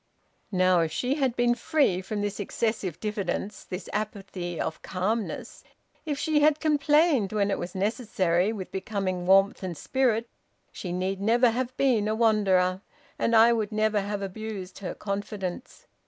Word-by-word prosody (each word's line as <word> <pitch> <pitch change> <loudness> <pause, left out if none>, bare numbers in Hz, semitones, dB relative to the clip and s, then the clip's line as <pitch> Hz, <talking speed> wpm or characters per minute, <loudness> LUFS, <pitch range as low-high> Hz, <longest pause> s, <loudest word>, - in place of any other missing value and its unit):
"Now, 185 -2 +4
if 165 -1 0
she 250 - 0
had 270 -5 0
been 240 0 +3
free 245 - +1
from 205 +2 -4
this 205 0 -3
excessive 205 -3 -2
diffidence, 210 -1 -3
this 180 +2 -7
apathy 195 -5 -4
of 160 - -3
calmness, 205 +4 -3 0.4
if 290 -2 -1
she 310 +1 +1
had 300 0 +4
complained 295 - +3
when 205 -1 +1
it - - -1
was 175 +1 -6
necessary, 195 -3 +1
with 195 -5 -6
becoming 190 -2 -3
warmth 195 +1 +4
and 180 -4 -5
spirit, 240 - +1 0.4
she 180 - -6
need 185 +2 -2
never 235 +3 +4
have 255 +2 -3
been 240 -6 +2
a 215 - 0
wanderer, 195 -5 +3 0.4
and 230 - +2
I 230 +1 +7
would 220 -2 -1
never 215 -1 +1
have 200 0 -3
abused 195 -1 -6
her 195 - -5
confidence. 200 +1 -5
210 Hz, 155 wpm, -27 LUFS, 185-235 Hz, 0.4 s, I